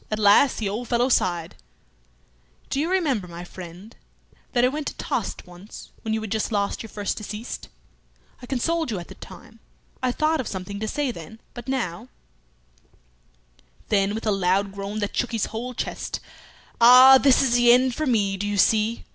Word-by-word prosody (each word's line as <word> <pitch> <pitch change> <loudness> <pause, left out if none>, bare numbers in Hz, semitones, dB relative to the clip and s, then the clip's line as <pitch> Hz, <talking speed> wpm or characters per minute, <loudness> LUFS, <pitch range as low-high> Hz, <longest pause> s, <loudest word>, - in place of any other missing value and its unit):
At 215 - -2
last 210 +6 +5
the 215 - -2
old 220 +5 -4
fellow 245 +2 +1
sighed 175 -8 0 1.2
"Do 275 - 0
you 315 +4 0
remember, 280 - 0
my 170 0 -8
friend, 180 +4 -11 0.6
that 245 0 +3
I - - +5
went 290 +3 -3
to - - -5
Tostes - - -4
once 180 +4 -12
when 220 - -4
you 220 - 0
had 215 -2 -6
just 220 +1 -1
lost 200 -2 -1
your 225 - -9
first 205 -1 -3
deceased? 215 +2 -7 0.7
I 245 - -10
consoled 320 +5 -1
you 215 - -2
at 170 - -8
that - - -13
time. 225 - -13 0.4
I 255 -1 +1
thought 310 +4 0
of 250 - -7
something 195 +1 -6
to 220 - -3
say 285 +3 -1
then, 220 +3 -11
but 240 0 -9
now 235 -6 -3 1.3
" - - -34
Then, 200 0 +1
with 225 - -5
a 215 - +2
loud 195 +1 +1
groan 200 +1 -6
that 205 - -3
shook 245 - -1
his 225 - 0
whole 245 +3 -5
chest, - - -4 0.6
"Ah! 255 +3 +9
this 275 -1 +4
is 250 -3 +1
the 240 0 +5
end 255 +1 +4
for 310 +4 -2
me, 200 -5 +1
do 205 +2 -3
you 205 0 -2
see! 220 +3 +2
220 Hz, 190 wpm, -24 LUFS, 195-250 Hz, 1.3 s, Ah